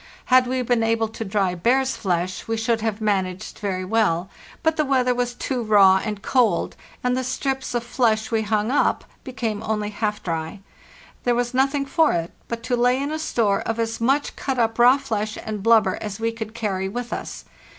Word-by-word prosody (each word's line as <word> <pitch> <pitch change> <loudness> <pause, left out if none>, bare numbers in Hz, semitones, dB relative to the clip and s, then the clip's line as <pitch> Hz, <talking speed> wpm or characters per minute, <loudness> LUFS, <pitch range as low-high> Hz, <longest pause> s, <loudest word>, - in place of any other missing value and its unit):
Had 255 -1 +6
we 255 +1 -1
been 245 -1 +1
able 225 0 +1
to 225 - -6
dry 195 -3 0
bear's 255 +9 +1
flesh 180 -2 -2
we 225 0 -1
should 225 0 0
have 220 -1 -2
managed 195 -1 -2
very 185 -2 -2
well; 195 -3 +1 0.3
but 320 -1 +2
the 310 - +2
weather 260 -3 +2
was 245 0 -2
too 255 -1 -2
raw 195 -4 +5
and 210 -2 -4
cold, 250 -4 +1 0.3
and 250 0 +1
the 260 - -1
strips 265 0 -2
of 240 - 0
flesh 225 -2 0
we 225 -1 +2
hung 215 +1 0
up 285 - +2 0.2
became 225 -5 -3
only 215 -1 -2
half 210 0 -2
dry. 165 +2 -4 0.6
There 245 -1 +2
was 245 +1 -1
nothing 275 +2 +1
for 315 +3 +3
it 170 0 -2 0.2
but 230 0 -5
to 250 +1 0
lay 245 +2 +2
in 285 +2 -2
a 315 - -2
store 220 -10 +1
of 225 0 -3
as 230 0 -2
much 275 +5 +1
cut 270 -2 -3
up 225 -1 0
raw 250 +3 +7
flesh 215 -4 -3
and 215 -2 -4
blubber 220 -3 +4
as 210 -1 -5
we 230 0 0
could 220 -1 -7
carry 190 -4 -2
with 240 +3 -5
us. - - -6
225 Hz, 200 wpm, -23 LUFS, 210-250 Hz, 0.6 s, raw